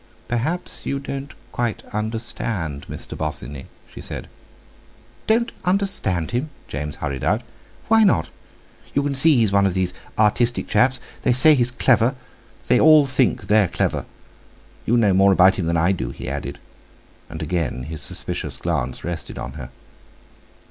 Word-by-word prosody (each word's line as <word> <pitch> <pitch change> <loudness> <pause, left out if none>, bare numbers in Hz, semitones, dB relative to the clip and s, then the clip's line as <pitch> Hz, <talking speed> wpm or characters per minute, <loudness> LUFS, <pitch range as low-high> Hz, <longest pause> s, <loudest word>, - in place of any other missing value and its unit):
"Perhaps 130 +10 -2
you 140 - -1
don't 140 0 -6 0.2
quite 120 -3 -2
understand 105 -8 -2
Mr. - - -6
Bosinney," 70 -3 -4 0.2
she - - -11
said. - - -6 1.0
"Don't 230 +2 +2
understand 180 - +1
him!" 125 +6 -1 0.2
James 75 +1 -5
hummed 65 -2 -4
out: 110 +3 +1 0.4
"Why 225 +1 +5
not?—you 160 -6 -2
can 145 0 -1
see 150 +3 +6
he's 115 -5 +3
one 100 0 +4
of 95 - -2
these 90 -1 0 0.2
artistic 115 +3 +2
chaps. 130 0 +2 0.2
They 125 - +2
say 155 +5 +6
he's 125 -4 +3
clever—they 125 0 0
all 155 -2 +7
think 130 -2 +1
they're 105 -2 +4
clever. - - -1 0.8
You 120 - +3
know 105 -5 +4
more 95 +1 +5
about 95 +1 +5
him 85 - -2
than 85 0 +1
I 85 +3 +3
do," 95 - -2
he - - -8
added; 70 +1 -4 0.7
and - - -6
again 85 -8 -2
his 75 +2 -6
suspicious 70 - -3
glance 70 -7 -2
rested 85 -1 -5
on 65 - -5
her. 65 -2 -8
110 Hz, 150 wpm, -22 LUFS, 85-130 Hz, 1.0 s, all